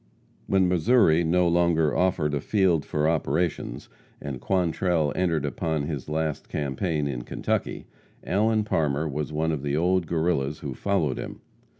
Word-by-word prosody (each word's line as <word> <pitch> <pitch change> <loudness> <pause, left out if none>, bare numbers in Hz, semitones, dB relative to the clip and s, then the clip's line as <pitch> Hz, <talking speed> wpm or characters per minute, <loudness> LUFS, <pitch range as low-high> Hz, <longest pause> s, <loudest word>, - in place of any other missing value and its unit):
] - - -35
When 95 -1 +3
Missouri 90 -2 +4
no 90 +2 +2
longer 85 -3 +2
offered 85 -5 +1
a 70 - -1
field 95 -7 +2
for 75 +1 0
operations, 85 +1 -1 0.3
and 70 -4 -6
Quantrell 85 -4 +1
entered 85 -5 0
upon 80 0 -2
his 75 -2 -5
last 80 -1 -2
campaign 75 +2 -2
in 65 -4 -3
Kentucky, - - -3 0.4
Allen 110 +3 +1
Parmer 80 -6 0
was 75 +1 -3
one 80 +2 0
of 75 -4 -2
the 70 +1 -1
old 90 +1 +1
Guerrillas 80 -4 0
who 70 -3 -4
followed 80 -4 -1
him. - - -7
80 Hz, 155 wpm, -25 LUFS, 75-90 Hz, 0.4 s, Missouri